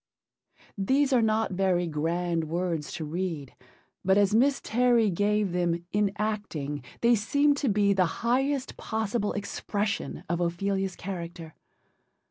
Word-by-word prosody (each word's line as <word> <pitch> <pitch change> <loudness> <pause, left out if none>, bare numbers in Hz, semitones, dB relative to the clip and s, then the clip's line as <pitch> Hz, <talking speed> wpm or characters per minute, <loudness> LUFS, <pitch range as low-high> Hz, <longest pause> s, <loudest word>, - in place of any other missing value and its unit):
These 270 +7 +2
are 245 - +5
not 220 -1 +1
very 185 -1 +1
grand 165 +1 -1
words 165 -1 -2
to 160 - -4
read, 160 -4 -4 0.5
but 190 +1 +4
as 205 0 +3
Miss 270 +5 +4
Terry 235 -2 +3
gave 205 +1 +1
them 170 -1 0
in 205 -1 +2
acting 170 - -3 0.2
they 235 +1 +5
seemed 285 +7 +2
to 280 -3 0
be 200 -1 +3
the 185 -2 +3 0.2
highest 270 +3 0
possible 220 -1 -1
expression 205 0 -3
of 170 +1 -1
Ophelia's 190 +2 -1
character. 170 -4 -7
195 Hz, 130 wpm, -27 LUFS, 175-220 Hz, 0.5 s, are